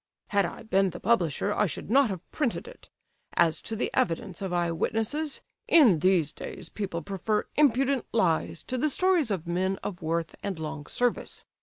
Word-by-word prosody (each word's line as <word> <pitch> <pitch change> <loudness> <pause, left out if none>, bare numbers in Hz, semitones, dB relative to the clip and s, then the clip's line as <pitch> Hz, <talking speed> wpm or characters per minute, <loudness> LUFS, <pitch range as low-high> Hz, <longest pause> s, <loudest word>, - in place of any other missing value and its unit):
"Had 200 -3 +2
I - - -9
been 195 -3 +2
the 175 0 -8
publisher 200 -3 +1
I 210 - +2
should 185 - -6
not 270 -1 +5
have 185 -3 -6
printed 290 - -1
it. - - -13 0.5
As 160 -2 +3
to 225 - -4
the 220 - -1
evidence 200 -6 -1
of 190 -2 -3
eye 175 -1 +1
witnesses, 225 - -1 0.2
in 245 - +6
these 180 -3 +2
days - - -8
people 185 -6 -4
prefer 200 +4 -1
impudent 275 -2 +3
lies 170 -6 +1
to 255 -1 -3
the 305 +4 +2
stories 355 -3 +2
of 185 -5 -2
men 185 +3 0
of 180 -4 -5
worth 165 0 -1
and 200 -3 -3
long 155 -2 -6
service. 245 -1 -1
200 Hz, 180 wpm, -28 LUFS, 170-245 Hz, 0.5 s, in